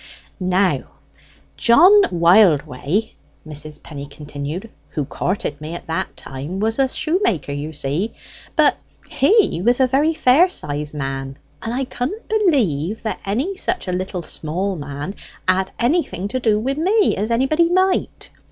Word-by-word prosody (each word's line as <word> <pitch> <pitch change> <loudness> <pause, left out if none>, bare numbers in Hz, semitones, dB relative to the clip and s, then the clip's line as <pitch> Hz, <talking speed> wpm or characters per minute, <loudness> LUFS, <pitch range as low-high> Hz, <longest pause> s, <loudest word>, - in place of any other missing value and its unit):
"Now, 185 +1 +1 0.7
John 295 +11 +6 0.2
Wildway," 170 - +3 0.4
Mrs. 150 0 -7
Penny 145 -2 -8
continued, 150 +7 -7 0.2
"who 150 - -3
courted 150 -2 -3
me 155 +2 -6
at - - -8
that 165 +4 -3
time, 145 +8 -6
was 225 +4 0
a 270 - +4
shoemaker, 310 - 0
you 145 +2 -4
see, 155 +8 -2 0.4
but - - +4 0.3
he 375 - +3
was 240 +4 +3
a 260 - +5
very 285 +5 +2
fair 305 +7 +5
sized 150 - -5
man, 135 -1 -4 0.2
and 225 - -4
I 260 +3 -1
couldn't 265 - -5
believe 225 - +1
that 220 - -3
any 265 - -1
such 365 - -2
a - - -1
little 180 0 -3
small 180 +6 -2
man 145 +3 -6 0.3
had 185 +1 +2
anything 240 - 0
to 255 - -2
do 220 -4 +2
wi' 260 +5 -1
me, 385 +8 +2
as 210 +3 -2
anybody 270 +8 +2
might. 375 +1 0
195 Hz, 145 wpm, -20 LUFS, -, 0.7 s, John